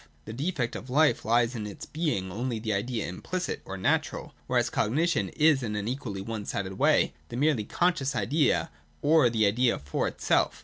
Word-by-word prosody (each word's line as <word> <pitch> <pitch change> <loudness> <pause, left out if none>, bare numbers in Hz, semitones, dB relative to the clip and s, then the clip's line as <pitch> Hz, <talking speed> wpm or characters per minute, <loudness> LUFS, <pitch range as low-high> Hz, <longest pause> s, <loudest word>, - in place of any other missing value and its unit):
The 110 - -7
defect 135 -2 -2
of 120 +7 -7
life 150 +4 +3
lies 120 +2 +3
in 110 -4 -4
its 100 - -8
being 145 - -2
only 120 +4 -2
the 110 0 -2
idea 110 +3 -2
implicit 180 - -4
or 95 - -6
natural: 95 - -1
whereas - - +1
cognition 160 +10 +1
is 150 -3 +3
in 110 -4 -3
an 105 0 -3
equally 120 -6 -4
one 110 +1 -5
sided 95 -1 -3
■way - - +3 0.2
the 120 - -5
merely 140 -6 +2
conscious 140 - 0
idea, 130 +8 +1 0.3
or 150 -4 +5
the 110 -2 +2
idea 120 +4 +2
for 70 0 -2
itself. - - +1
120 Hz, 180 wpm, -28 LUFS, 105-145 Hz, 0.3 s, or